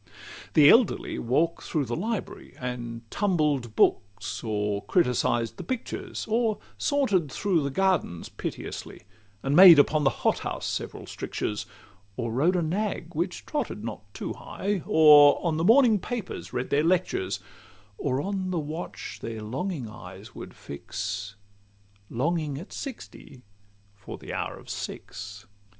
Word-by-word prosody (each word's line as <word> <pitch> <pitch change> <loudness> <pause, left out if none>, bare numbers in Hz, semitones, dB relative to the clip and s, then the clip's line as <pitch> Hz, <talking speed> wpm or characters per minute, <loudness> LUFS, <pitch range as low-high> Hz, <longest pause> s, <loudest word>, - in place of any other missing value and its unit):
CII - - -28
The 150 -2 +8
elderly 235 -2 +3
walk'd 155 +8 +1
through 150 -4 -1
the 120 0 -3
library, 220 +3 -4
And 120 -2 -5
tumbled 150 - 0
books, 100 -1 +1
or 105 -2 -1
criticised 120 -7 +1
the - - -6
pictures, 255 -3 -4
Or 225 -1 +1 0.2
saunter'd 205 - +1
through 190 -2 +1
the 140 - -1
gardens 175 - 0
piteously, - - -7 0.4
And 135 +1 +1
made 180 -2 +11
upon 150 +1 +4
the 135 - +5 0.2
hot - - +3
house - - -4
several - - -4
strictures, 105 - -4 0.5
Or 120 -2 -2
rode 155 +10 +2
a 175 - +1
nag 180 0 -2
which 175 +3 -3
trotted 300 - -3
not - - -7
too - - -5
high, 200 -2 -3
Or 150 -2 +8
on 160 -2 +1
the 160 - 0
morning 225 +1 +6
papers 230 -1 -5
read 125 - -3
their 145 +2 +3
lectures, 170 - 0 0.6
Or 130 +2 0
on 190 -2 -2
the 180 - -1
watch 155 +2 -5
their 110 -1 -5
longing 135 - -3
eyes 100 -2 -11
would - - -9
fix, 95 +7 -5 0.7
Longing 150 +2 -1
at 175 +8 -9
sixty 235 - -9 0.5
for 105 -1 -9
the - - -8
hour - - -3
of - - -15
six. 100 0 -7
150 Hz, 145 wpm, -27 LUFS, 120-185 Hz, 0.7 s, made